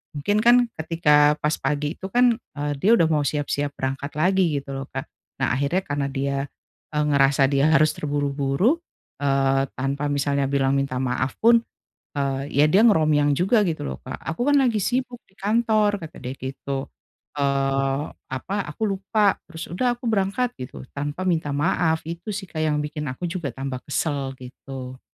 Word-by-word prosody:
Mungkin 205 +9 +1
kan 240 +2 +6 0.2
ketika 150 -2 +4
pas 150 0 +2
pagi 145 +3 -1
itu 190 - -5
kan, 240 +2 +3 0.2
eee, 145 0 -2
dia 200 +9 +3
udah 165 -8 +4
mau 150 -2 +2
siap-siap 145 0 -2
berangkat 135 +2 -3
lagi 185 +5 +3 0.2
gitu 140 - -9
loh, 135 0 -4
Kak. - - -4 0.4
Nah, - - +2
akhirnya 140 +7 +1
karena 145 -4 -2
dia, 140 0 -2 0.6
eee, 150 - +2
ngerasa 140 -1 +3
dia 140 +2 +3
harus 155 0 +5
terburu-buru, 145 - 0 0.4
eee, 135 -1 +2
tanpa 135 +2 -2
misalnya 140 -1 0
bilang 135 -1 +1
minta 135 -2 -2
maaf 130 +1 -1
pun, 235 0 +7 0.6
eee, 135 -1 -1
ya 145 - +4
dia 200 +8 +5
ngeromiang 155 -8 +4
juga 195 - +3
gitu 165 -4 -2
loh, 65 - -4
Kak, - - -6
"Aku 165 +10 -3
kan 290 0 +4
lagi 245 -5 +2
sibuk 250 -1 -1
di - - -32
kantor!" 215 0 +2
Kata 155 - -11
dia 130 +1 -6
gitu. 135 +1 -5 0.4
Eee, 135 0 0 0.2
apa, 130 +10 -4
"Aku 150 +9 -3
lupa!" 200 0 +1
terus, 165 -1 -8
"udah 245 +6 +1
aku 240 - -15
berangkat." 210 +5 0
gitu, 125 +1 -7
tanpa 145 +5 -4
minta 165 -5 0
maaf, 160 +2 +1
itu 170 +4 -7
sih, 195 - -4
Kak, 155 - -4
yang 155 -1 +1
bikin 150 0 -4
aku 130 +7 -6
juga 170 -3 -3
tambah 135 -1 -4
kesel, 140 -3 -1
gitu. 130 0 -9
145 Hz, 170 wpm, -23 LUFS, 135-190 Hz, 0.6 s, pun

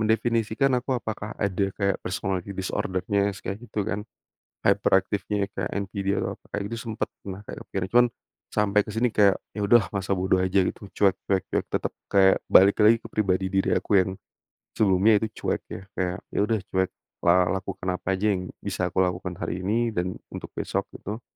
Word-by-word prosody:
mendefinisikan, 115 +3 +1
aku 130 +1 -1
apakah 110 -2 -5
ada 100 -1 0
kayak 100 -2 0
personality 95 +1 -3
disorder-nya, 100 +2 0
s - - -14
kayak 100 +3 -4
gitu 105 -2 -2
kan. 105 -1 -2 0.7
Hyperactive-nya 100 -1 +2
kayak 90 -2 -2
NPD 100 0 -2
atau - - -2
apa. - - -40
Kayak 100 - -1
gitu 115 - -4
sempet 110 - -2 0.2
pernah 95 -1 -6
kayak - - -7
akhirnya 95 -1 -3
cuman, 120 0 +7 0.5
sampai 105 0 +3
ke - - -5
sini, 120 +2 +2
kayak 100 -2 +5 0.2
ya, - - -1
udahlah, 110 -5 +5
masa 100 -1 -1
bodo 95 0 +2
aja 95 +1 +3
gitu, 100 - -4
cuek 100 -2 +4
cuek 95 -2 +2
ya - - +2
tetep - - -2 0.2
kayak 95 -1 +5
balik 100 +2 +6
lagi 110 +2 +6
ke - - -7
pribadi 95 -3 +1
diri 95 0 +2
aku 100 - +3
yang 95 - +1 0.6
sebelumnya 105 +1 +4
itu 110 - 0 0.2
cuek - - 0
ya. - - -6
Kayak, 90 -1 -1 0.2
ya, - - 0
udah, 110 -1 +1
cuek, 95 0 +2 0.3
la 90 +1 +4
lakukan 95 -1 -5
apa 95 +1 -1
aja 105 - -2
yang 90 -1 -4
bisa - - -2
aku - - -11
lakukan 90 0 -3
hari 90 +2 -3
ini 115 +3 +1
dan 90 +1 -1 0.2
untuk - - -6
besok, - - -2
gitu. 110 +4 -6
100 Hz, 190 wpm, -26 LUFS, 95-110 Hz, 0.7 s, cuman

